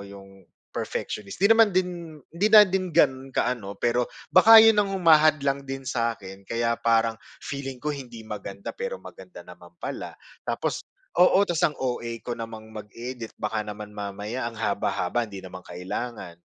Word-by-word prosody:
yung 95 -2 -13 0.2
perfectionist, 100 -2 -4
di 200 - +5
naman 225 -1 +6
din 175 -3 -2 0.2
hindi 185 +6 +1
na 215 -1 +9
din 190 -1 -1
gano'n 130 -2 +2
ka - - +2
ano, 100 -5 -7
pero 120 +1 0 0.2
baka 225 +5 +9
yun 225 -1 +6
ang 200 - 0
humahadlang 155 -5 +4
din 135 0 -5
sa 115 -2 -1
'kin, 95 -2 -11
kaya 115 0 0
parang 115 -1 +2 0.3
feeling 135 -2 -5
ko 150 +2 -2
hindi 120 -5 -9
maganda, 100 -2 -7
pero 485 +1 -4
maganda - - -12
naman - - -14
pala. - - -6 0.3
Tapos - - -1 0.4
oo, 190 +2 +6
ta's 170 -3 0
ang 150 -4 +1
OA 120 -2 -3
ko 120 - -3
namang 110 -1 -8
mag-edit, 115 +3 -8
baka 110 +1 -2
naman 105 0 -8
mamaya 105 +4 -4
ang 115 - -12
haba-haba 105 +1 -1
hindi 100 -2 -8
naman 95 0 -9
kailangan. 90 0 -6
120 Hz, 165 wpm, -25 LUFS, 105-155 Hz, 0.4 s, na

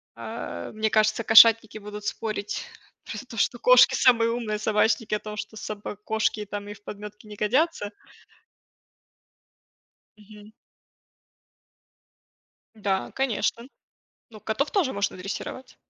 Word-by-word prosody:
Э, 85 0 -7
мне 220 0 0
кажется, 215 +1 +2
кошатники 225 -1 +7
будут 210 0 -9
спорить 210 -2 -3 0.4
про - - -6
то, - - -11
что - - +1
кошки - - +6
самые 230 -3 +4
умные, 220 -3 -3
собачники 215 +1 +1
о - - -2
том, 210 0 -8
что 215 +1 -7
собак 210 -1 -7
кошки 220 -1 -1
там 205 0 -6
и 205 - -6
в 205 0 -19
подметки 210 +1 -9
не 210 0 -10
годятся. 225 +1 0 2.3
Мгм. 210 0 -15 2.2
Да, 195 -3 -2
конечно. 245 -1 -1 0.6
Ну, 215 -2 -13
котов 220 +8 -2
тоже 345 -10 +1
можно 200 -1 -2
дрессировать. 225 +7 -7
215 Hz, 120 wpm, -25 LUFS, 210-230 Hz, 2.3 s, кошатники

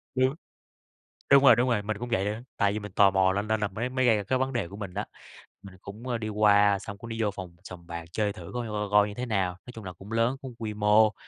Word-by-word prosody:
Đúng. 130 +3 +2 1.0
Đúng 140 0 +7
rồi, - - +8
đúng 125 +2 +2
rồi, 105 -3 +1
mình 110 0 -3
cũng 120 - -5
vậy 100 -4 +1
nữa, 105 +2 -2 0.2
tại 100 -2 +2
vì 105 - -2
mình 105 -2 -8
tò 100 0 +5
mò 95 -1 +3
lên 100 +2 -2
nên 110 -1 +1
la - - 0
la - - -22
mới 120 +3 -2
mới 130 0 0
gây 115 -2 +5
ra 105 - -2
cái 130 +6 0
vấn 130 +1 -1
đề 115 -8 -2
của 100 - -10
mình 95 -4 -7
á, 105 +2 -3 0.6
mình 95 -1 -12
cũng, 110 +6 -9
ơ, 120 -2 -1
đi 110 -1 -4
qua 105 -1 +4
xong 100 0 -8
cũng 115 +3 -10
đi 115 0 -3
vô 105 -2 +1
phòng 95 -3 -9
sòng 90 -2 -11
bạc 85 -1 -6
chơi 105 +1 -1
thử 90 +1 -10
coi 120 -2 -3
coi 105 -1 -3
coi 105 0 +5
như 105 - -7
thế 125 +4 -4
nào, 95 -6 0
nói 125 - -10
chung 110 - -9
là 90 - -6
cũng 95 +5 -13
lớn, 115 +4 +1
cũng 130 -3 -8
quy 110 -2 -4
mô, 105 +1 +4
105 Hz, 300 wpm, -27 LUFS, 100-115 Hz, 1.0 s, rồi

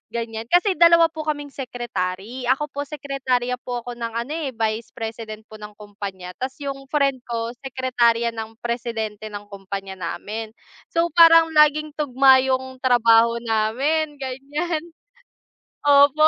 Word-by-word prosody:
ganiyan, 230 -1 -4
kasi 360 - +3
dalawa 335 0 +7
po 315 -1 -6
kaming 290 -1 -3
secretary, 240 -2 -4
ako 270 +4 +1
po 285 0 -3
sekretarya 265 -4 -2
po 245 -1 -4
ako 245 0 -7
ng 230 -1 -4
ano 235 +6 -3
eh 305 -5 -3
Vice 220 0 -2
President 220 -1 -6
po 215 - -12
ng 210 0 -9
kumpanya 200 -3 -7
tapos 260 +1 -4
yung 275 -1 -5
friend 275 -3 +2
ko 230 -1 -3
sekretarya 245 -3 +1
ng 225 0 -6
Presidente 225 -3 -4
ng 205 0 -8
kompanya 195 -1 -6
namin. 215 +4 -5 0.4
So 335 +1 +2
parang 330 -1 +7
laging 300 0 +4
tugma 265 -2 +5
yung 260 0 -1
trabaho 235 -2 +4
namin 270 +8 0
ganiyan. 290 +5 -3 1.0
Opo. 290 +1 +6
250 Hz, 140 wpm, -22 LUFS, 225-285 Hz, 1.0 s, dalawa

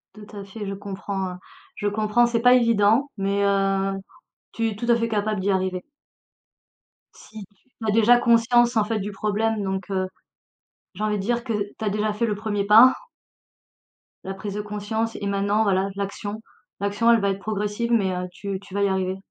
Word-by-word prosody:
Tout 210 0 -12
à 200 - -7
fait, 205 +2 -7
je 195 - -4
comprends, 195 -1 -5
heu, - - -8 0.4
je 205 - -2
comprends, 215 +3 +2
c'est 235 -1 0
pas 245 +1 +6
évident 230 +2 +3
mais, 200 +1 0
heu, 195 -1 +1 0.6
tu 230 0 -1
es 210 - -7
tout 225 - -6
à 235 - +6
fait 230 0 -1
capable 210 -2 -1
d'y 195 +2 0
arriver. 185 -1 -1 1.3
Si 220 -1 -12
tu 200 - -37
tu 220 - -4
as - - +3
déjà 225 +3 +5
conscience 240 0 +3
en 215 - +4
fait 220 +1 -2
du 205 +1 -4
problème 215 +2 -1
donc, 190 +1 -3
heu, 185 -1 0 0.9
j'ai 210 - -4
envie 210 -1 0
de - - -3
dire 235 +4 -1
que 235 -3 -3
tu 210 +1 -4
as - - +1
déjà 210 +1 0
fait 210 +3 0
le 215 - 0
1er 205 -1 -2
pas 225 +5 +8 1.3
la 195 - -5
prise 195 +1 -6
de 210 - -2
conscience 210 +2 -3
et 200 - -3
maintenant 200 +2 +1
voilà, 195 -1 +1
l'action, 205 +2 -5 0.4
l'action, 205 +4 +2
elle 230 - +5
va 200 -1 +1
être 195 0 -2
progressive, 210 +3 -2
mais 200 -5 +2
heu, 180 0 -3
tu 195 +1 -5
tu 195 - -15
vas 200 0 0
y - - +3
arriver. 190 -1 -1
205 Hz, 200 wpm, -23 LUFS, 195-225 Hz, 1.3 s, pas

